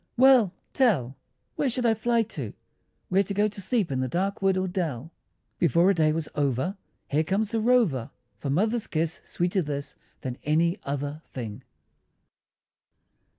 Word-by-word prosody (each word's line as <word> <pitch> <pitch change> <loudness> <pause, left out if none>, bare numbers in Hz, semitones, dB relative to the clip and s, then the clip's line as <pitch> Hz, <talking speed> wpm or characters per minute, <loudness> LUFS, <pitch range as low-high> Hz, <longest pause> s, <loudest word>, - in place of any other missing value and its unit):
Well 255 -6 +6 0.2
tell! 165 - +2 0.4
Where 280 - +1
should 245 0 -1
I 230 - +5
fly 230 +1 +1
to, 145 - -6 0.6
Where 190 +2 +4
go 200 +2 +1
to 205 -1 -6
sleep 210 - 0
in 130 - -1
the 130 - 0
dark 195 +9 -1
wood 195 -1 +3
or 185 0 0
dell? 165 - -3 0.5
Before 170 +4 +4
a - - +3
day 155 -3 +3
was 155 0 -2
over, 145 - 0 0.4
Home 150 +2 +3
comes 200 +6 0
the 225 -1 0
rover, 215 - +2 0.3
For 140 - -4
Mother's 215 - +1
kiss, 160 +1 -1
sweeter 180 +2 0
this 145 -2 -4 0.3
Than 130 -2 -5
any 165 +4 +2
other 145 +2 -3
thing! 115 -2 -7
175 Hz, 155 wpm, -26 LUFS, 145-210 Hz, 0.6 s, Well